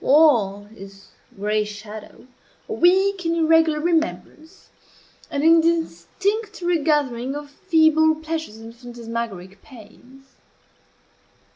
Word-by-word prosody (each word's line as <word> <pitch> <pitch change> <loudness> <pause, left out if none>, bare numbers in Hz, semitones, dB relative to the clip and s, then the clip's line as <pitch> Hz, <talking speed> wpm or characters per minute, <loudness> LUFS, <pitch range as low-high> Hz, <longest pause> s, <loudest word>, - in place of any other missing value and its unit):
All 235 -10 +3
is 195 -1 -14 0.3
gray 210 +2 -1
shadow 210 +2 -10 0.4
a 440 - -4
weak 380 0 +2
and 335 0 0
irregular 325 -1 +3
remembrance 320 +1 -3 0.6
an 285 0 -3
indistinct 335 - +1
regathering 295 -7 0
of 290 -1 -8
feeble 315 -1 +3
pleasures 315 -7 -6
and 225 +1 -12
phantasmagoric 230 -6 -7
pains. 250 +2 -16
295 Hz, 95 wpm, -22 LUFS, 225-325 Hz, 0.6 s, All